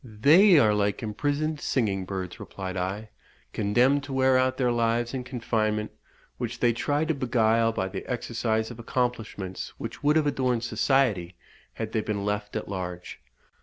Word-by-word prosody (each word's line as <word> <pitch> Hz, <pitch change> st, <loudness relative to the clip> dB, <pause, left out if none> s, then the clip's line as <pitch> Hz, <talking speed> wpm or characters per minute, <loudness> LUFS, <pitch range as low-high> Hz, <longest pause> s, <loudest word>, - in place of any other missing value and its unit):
"They 150 Hz, -, +5 dB
are 110 Hz, -7 st, +5 dB
like 105 Hz, +2 st, 0 dB
imprisoned 145 Hz, +8 st, -1 dB
singing 100 Hz, -7 st, 0 dB
birds," 95 Hz, -1 st, -5 dB
replied 95 Hz, -1 st, -6 dB
I, 95 Hz, +4 st, -3 dB, 0.4 s
"condemned 125 Hz, +7 st, +2 dB
to 140 Hz, -, -6 dB
wear 130 Hz, 0 st, +3 dB
out 130 Hz, 0 st, +2 dB
their 125 Hz, -2 st, +2 dB
lives 120 Hz, +1 st, 0 dB
in 130 Hz, -2 st, -3 dB
confinement, 110 Hz, -4 st, -1 dB, 0.5 s
which -, -, -4 dB
they 120 Hz, -1 st, +3 dB
try 145 Hz, +6 st, 0 dB
to 160 Hz, -, +1 dB
beguile 115 Hz, -4 st, +2 dB
by 95 Hz, -4 st, -2 dB
the 95 Hz, 0 st, -6 dB
exercise 115 Hz, -2 st, -1 dB
of 120 Hz, -, -10 dB
accomplishments 115 Hz, -6 st, -3 dB
which -, -, -7 dB
would 150 Hz, +1 st, +3 dB
have 155 Hz, -1 st, +3 dB
adorned 130 Hz, -4 st, 0 dB
society 115 Hz, -9 st, +1 dB, 0.4 s
had 110 Hz, -1 st, -5 dB
they 110 Hz, -, 0 dB
been 105 Hz, -2 st, -3 dB
left 105 Hz, 0 st, -3 dB
at 110 Hz, -, -3 dB
large." 90 Hz, -7 st, -6 dB
115 Hz, 165 wpm, -26 LUFS, 105-130 Hz, 0.5 s, They